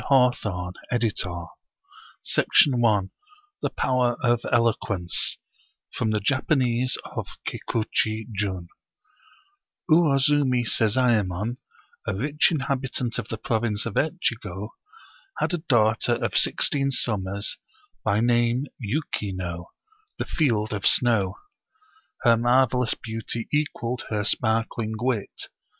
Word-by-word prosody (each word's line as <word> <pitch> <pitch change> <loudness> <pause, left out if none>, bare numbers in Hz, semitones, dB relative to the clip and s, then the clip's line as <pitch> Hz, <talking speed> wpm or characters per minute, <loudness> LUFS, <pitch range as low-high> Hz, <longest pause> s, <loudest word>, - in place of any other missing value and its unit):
14 125 -5 +3 0.4
Oriental 95 -8 -1 0.7
Mystery - - 0
Stories 115 -8 +5 0.5
The - - 0
Power 125 -2 +1
of 120 -1 +3
Eloquence 110 -7 0 0.6
From 110 - -1
the 110 0 +1
Japanese 130 +1 +1 0.2
of - - -3 0.2
Kikuchi 110 -1 -1
Jun 95 -4 -2 1.2
UWOZUMI 140 -5 +3
SEZAEMON, 110 -2 +1 0.5
a 100 - -1
rich 145 +8 +2
inhabttent 135 -5 -1
of - - -5
the 110 - -4
province 110 -1 -1
of 115 - -3
Etchigo, 110 - -2 0.7
had - - 0
a 175 - 0
daughter 120 -6 +2
of - - -3
sixteen 140 -1 +2
sum 110 -7 +1
mers, 100 +2 -2 0.5
by 105 -1 +2
name 120 +2 +2
Yuki 115 -3 -2
no, 85 -2 -5 0.2
" 430 0 -40
the - - -2
field 110 - 0
of 100 -1 -3
snow." 110 -7 +3 0.9
Her 120 -2 +6
marvel 125 +1 +3
ous 120 - +1
beauty 115 +1 -5
equaled 125 -5 -1
her 105 -2 -1
sparkling 110 0 0
wit. 120 -4 -2
115 Hz, 110 wpm, -25 LUFS, 105-130 Hz, 1.2 s, Her